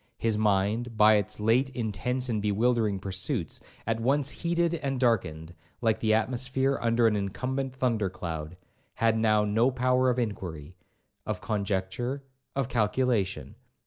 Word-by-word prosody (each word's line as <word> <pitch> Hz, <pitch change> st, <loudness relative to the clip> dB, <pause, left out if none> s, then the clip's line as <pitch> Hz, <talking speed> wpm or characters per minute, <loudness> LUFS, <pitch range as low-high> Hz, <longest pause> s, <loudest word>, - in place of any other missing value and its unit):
His 115 Hz, -1 st, 0 dB
mind, 105 Hz, +3 st, +1 dB
by 110 Hz, 0 st, +7 dB
its 100 Hz, 0 st, -3 dB
late 115 Hz, +5 st, +3 dB
intense 125 Hz, +3 st, -1 dB
and 110 Hz, -4 st, -1 dB
bewildering 105 Hz, 0 st, +1 dB
pursuits, 95 Hz, -, -2 dB, 0.3 s
at 115 Hz, 0 st, -1 dB
once 135 Hz, +4 st, +2 dB
heated 170 Hz, 0 st, 0 dB
and 140 Hz, -5 st, -2 dB
darkened, 85 Hz, -10 st, 0 dB, 0.3 s
like 110 Hz, -2 st, +1 dB
the 110 Hz, -, +1 dB
atmosphere 130 Hz, +4 st, +1 dB
under 115 Hz, 0 st, +2 dB
an 110 Hz, -2 st, +4 dB
incumbent 130 Hz, +7 st, -3 dB
thunder 115 Hz, -6 st, 0 dB
cloud, 85 Hz, -2 st, -6 dB, 0.4 s
had 115 Hz, -1 st, +2 dB
now 110 Hz, -1 st, +3 dB
no 110 Hz, +5 st, +3 dB
power 130 Hz, 0 st, +2 dB
of 125 Hz, -, 0 dB
inquiry, 90 Hz, -8 st, -4 dB, 0.5 s
of 105 Hz, -4 st, -3 dB
conjecture, 100 Hz, +3 st, -2 dB
or 140 Hz, 0 st, -8 dB, 0.4 s
of 130 Hz, -, -2 dB
calculation. 105 Hz, -, 0 dB
115 Hz, 145 wpm, -28 LUFS, 100-125 Hz, 0.5 s, by